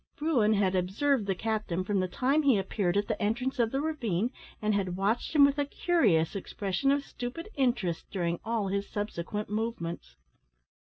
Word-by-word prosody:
Bruin 260 Hz, -9 st, +2 dB
had 195 Hz, -2 st, +2 dB
observed 205 Hz, +6 st, +1 dB
the 195 Hz, -, +1 dB
captain 215 Hz, -4 st, -2 dB
from 200 Hz, +1 st, 0 dB
the 185 Hz, -, +1 dB
time 265 Hz, -, +1 dB
he 275 Hz, -7 st, +4 dB
appeared 195 Hz, -1 st, 0 dB
at 205 Hz, -, +1 dB
the 220 Hz, -, -2 dB
entrance 250 Hz, +6 st, -1 dB
of 230 Hz, -2 st, +2 dB
the 270 Hz, -, 0 dB
ravine, 245 Hz, -, -1 dB, 0.3 s
and 215 Hz, 0 st, +1 dB
had 190 Hz, -3 st, 0 dB
watched 215 Hz, +10 st, 0 dB
him 285 Hz, -2 st, +8 dB
with 280 Hz, +1 st, +1 dB
a 285 Hz, -, +2 dB
curious 215 Hz, -, +2 dB
expression 200 Hz, +6 st, -1 dB
of 280 Hz, 0 st, +1 dB
stupid 250 Hz, +11 st, -6 dB
interest 235 Hz, -, 0 dB
during 170 Hz, -3 st, -1 dB
all 220 Hz, -3 st, -1 dB
his 200 Hz, +1 st, -2 dB
subsequent 205 Hz, 0 st, -3 dB
movements. 210 Hz, -, -3 dB
215 Hz, 175 wpm, -29 LUFS, 190-265 Hz, 0.3 s, him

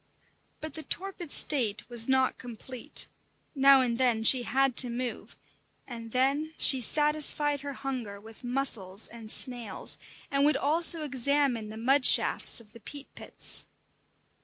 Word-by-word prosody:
But 315 Hz, -, -8 dB
the 320 Hz, -, -8 dB
torpid 360 Hz, 0 st, -6 dB
state 235 Hz, -8 st, +1 dB
was 235 Hz, -2 st, +2 dB
not 260 Hz, 0 st, 0 dB
complete; 245 Hz, +1 st, -7 dB, 0.5 s
now 275 Hz, -2 st, +4 dB
and 240 Hz, -1 st, -3 dB
then 240 Hz, -4 st, 0 dB
she 250 Hz, +3 st, +6 dB
had 265 Hz, +2 st, -1 dB
to 250 Hz, -, +7 dB
move, 245 Hz, +1 st, -7 dB, 0.5 s
and 230 Hz, -2 st, -11 dB
then 280 Hz, +5 st, -2 dB
she 265 Hz, -2 st, +4 dB
satisfied 295 Hz, +1 st, +1 dB
her 285 Hz, 0 st, -8 dB
hunger 255 Hz, -7 st, -7 dB
with 220 Hz, +3 st, -16 dB
mussels 235 Hz, -6 st, 0 dB
and 225 Hz, -2 st, -13 dB
snails, 240 Hz, -1 st, -3 dB, 0.3 s
and 275 Hz, 0 st, 0 dB
would 295 Hz, -1 st, +1 dB
also 325 Hz, +2 st, +3 dB
examine 265 Hz, -4 st, -2 dB
the 220 Hz, -, -11 dB
mud 265 Hz, +4 st, 0 dB
shafts -, -, +4 dB
of 215 Hz, -2 st, -19 dB
the 230 Hz, -, -15 dB
peat 280 Hz, +5 st, -12 dB
pits. -, -, 0 dB
260 Hz, 145 wpm, -26 LUFS, 235-285 Hz, 0.5 s, to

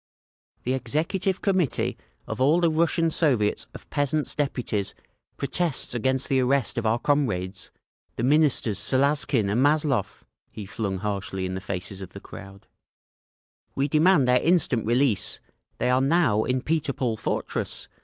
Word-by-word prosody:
"The 125 Hz, -, 0 dB
Executive 160 Hz, -, -1 dB
Committee 190 Hz, -7 st, +1 dB, 0.3 s
of -, -, -6 dB
the -, -, +3 dB
All 155 Hz, +6 st, +4 dB
Russian 165 Hz, 0 st, +2 dB
Soviets 125 Hz, -11 st, +1 dB
of -, -, -11 dB
Peasants' 145 Hz, +1 st, 0 dB
Deputies 125 Hz, -8 st, -2 dB, 0.4 s
protests 155 Hz, -1 st, -1 dB
against 130 Hz, +2 st, 0 dB
the 135 Hz, -, +2 dB
arrest 130 Hz, -2 st, +1 dB
of 115 Hz, -, -1 dB
our 110 Hz, +2 st, +2 dB
comrades, 110 Hz, -10 st, -1 dB, 0.4 s
the -, -, -3 dB
Ministers 135 Hz, -7 st, +3 dB
Salazkin 130 Hz, -1 st, +2 dB
and 105 Hz, +5 st, +1 dB
Mazlov!" 145 Hz, -6 st, +1 dB, 0.3 s
he 105 Hz, -, -8 dB
flung 100 Hz, -1 st, -3 dB
harshly 100 Hz, -1 st, -3 dB
in 90 Hz, -, -3 dB
the 95 Hz, -, -4 dB
faces 95 Hz, +1 st, -5 dB
of 95 Hz, -1 st, -9 dB
the 100 Hz, -, -8 dB
crowd, 100 Hz, 0 st, -12 dB, 1.1 s
"We 135 Hz, +1 st, +1 dB
demand 155 Hz, -1 st, +4 dB
their 125 Hz, 0 st, +4 dB
instant 155 Hz, -10 st, +2 dB
release! 120 Hz, -3 st, +1 dB, 0.4 s
They 125 Hz, -, +1 dB
are 130 Hz, +1 st, +3 dB
now 135 Hz, -7 st, +2 dB
in 125 Hz, 0 st, -1 dB
Peter 155 Hz, -3 st, 0 dB
Paul 120 Hz, -4 st, -1 dB
fortress. -, -, -3 dB
130 Hz, 145 wpm, -25 LUFS, 105-150 Hz, 1.1 s, All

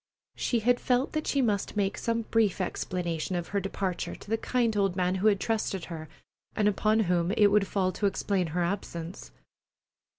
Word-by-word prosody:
She 235 Hz, -3 st, 0 dB
had 245 Hz, +2 st, +3 dB
felt 250 Hz, +1 st, +1 dB
that 310 Hz, 0 st, -2 dB
she 275 Hz, -2 st, +2 dB
must 210 Hz, -2 st, -1 dB
make 195 Hz, -1 st, +1 dB
some 230 Hz, 0 st, -1 dB
brief 220 Hz, -4 st, +1 dB
explanation 180 Hz, -2 st, -2 dB
of 175 Hz, -1 st, -3 dB
her 200 Hz, -, 0 dB
departure 195 Hz, -1 st, -3 dB
to -, -, -13 dB
the -, -, +4 dB
kind 230 Hz, 0 st, 0 dB
old 195 Hz, -3 st, +1 dB
man 180 Hz, -1 st, +1 dB
who 215 Hz, -, +4 dB
had 200 Hz, -2 st, +4 dB
trusted 210 Hz, -5 st, -1 dB
her, 160 Hz, -1 st, -7 dB, 0.5 s
and 210 Hz, -1 st, +2 dB
upon 215 Hz, +2 st, +2 dB
whom 175 Hz, -3 st, +1 dB
it 210 Hz, -3 st, +5 dB
would 205 Hz, -1 st, +3 dB
fall 185 Hz, -2 st, +1 dB
to 205 Hz, -, 0 dB
explain 195 Hz, -2 st, 0 dB
her 175 Hz, +3 st, -1 dB
absence. 170 Hz, -1 st, -4 dB
200 Hz, 190 wpm, -28 LUFS, 180-220 Hz, 0.5 s, it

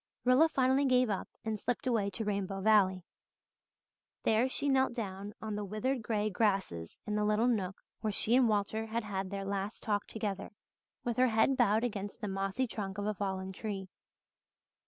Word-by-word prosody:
Rilla 260 Hz, +6 st, +6 dB
finally 265 Hz, 0 st, +3 dB
gave 250 Hz, -3 st, +4 dB
up 195 Hz, -, -2 dB, 0.2 s
and 220 Hz, -1 st, -2 dB
slipped 245 Hz, +6 st, -2 dB
away 225 Hz, -6 st, +1 dB
to 220 Hz, +3 st, -3 dB
Rainbow 195 Hz, -1 st, -2 dB
Valley. 190 Hz, -3 st, +4 dB, 1.2 s
There 225 Hz, +4 st, +3 dB
she 285 Hz, +2 st, -1 dB
knelt 265 Hz, -3 st, +3 dB
down 200 Hz, -2 st, -5 dB
on 215 Hz, -1 st, -3 dB
the 210 Hz, 0 st, -2 dB
withered 225 Hz, +6 st, -1 dB
grey 215 Hz, -1 st, 0 dB
grasses 190 Hz, -, 0 dB
in 210 Hz, -, -2 dB
the 210 Hz, 0 st, +1 dB
little 210 Hz, +2 st, +2 dB
nook 195 Hz, -6 st, -1 dB, 0.2 s
where 215 Hz, -, -1 dB
she 220 Hz, +3 st, +2 dB
and 255 Hz, -3 st, +5 dB
Walter 215 Hz, +1 st, 0 dB
had 230 Hz, +1 st, -2 dB
had 195 Hz, -2 st, -3 dB
their 195 Hz, 0 st, -4 dB
last 200 Hz, +2 st, -3 dB
talk 205 Hz, -2 st, 0 dB
together, 210 Hz, -3 st, -3 dB, 0.5 s
with 240 Hz, -2 st, -2 dB
her 255 Hz, 0 st, +5 dB
head 225 Hz, +4 st, +3 dB
bowed 215 Hz, -1 st, +3 dB
against 205 Hz, -4 st, -3 dB
the 210 Hz, -, -3 dB
mossy 195 Hz, +5 st, -1 dB
trunk 200 Hz, -4 st, -5 dB
of 205 Hz, -, -2 dB
a 215 Hz, -, 0 dB
fallen 190 Hz, -1 st, -3 dB
tree. 195 Hz, -1 st, -5 dB
210 Hz, 180 wpm, -32 LUFS, 195-235 Hz, 1.2 s, Rilla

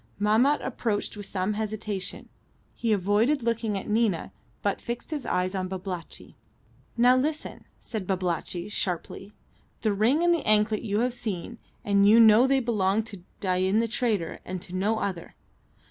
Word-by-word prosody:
Mahmat 225 Hz, +8 st, +3 dB
approached 210 Hz, -4 st, -2 dB
with 205 Hz, -1 st, -7 dB
some 190 Hz, +2 st, -1 dB
hesitation. 210 Hz, -3 st, -4 dB, 0.5 s
He 230 Hz, -, -1 dB
avoided 215 Hz, +8 st, +2 dB
looking 225 Hz, -3 st, -1 dB
at 195 Hz, -, -6 dB
Nina, 210 Hz, -6 st, +1 dB, 0.3 s
but 200 Hz, -, 0 dB
fixed 240 Hz, +6 st, -5 dB
his 295 Hz, -4 st, -4 dB
eyes 185 Hz, +1 st, 0 dB
on 185 Hz, -1 st, -2 dB
Babalatchi. 185 Hz, -2 st, -7 dB, 0.6 s
"Now, 245 Hz, +2 st, +6 dB
listen," 300 Hz, +4 st, -2 dB
said 215 Hz, -6 st, -5 dB
Babalatchi, 180 Hz, -1 st, -2 dB
sharply. 195 Hz, 0 st, -4 dB, 0.5 s
"The 215 Hz, -2 st, +1 dB
ring 240 Hz, +11 st, +2 dB
and 345 Hz, 0 st, +4 dB
the 335 Hz, -, -1 dB
anklet 215 Hz, 0 st, +3 dB
you 210 Hz, 0 st, -1 dB
have 250 Hz, 0 st, 0 dB
seen, 225 Hz, 0 st, -5 dB, 0.3 s
and 200 Hz, 0 st, +4 dB
you 225 Hz, +2 st, +7 dB
know 225 Hz, +3 st, +7 dB
they 270 Hz, 0 st, +3 dB
belonged 215 Hz, -3 st, +1 dB
to 200 Hz, -3 st, -10 dB, 0.2 s
Dain 185 Hz, +1 st, +1 dB
the 230 Hz, +1 st, +2 dB
trader, 220 Hz, -6 st, -1 dB
and 185 Hz, 0 st, -5 dB
to 180 Hz, -, -11 dB
no 205 Hz, +4 st, +1 dB
other. 185 Hz, -5 st, -4 dB
210 Hz, 160 wpm, -27 LUFS, 190-235 Hz, 0.6 s, you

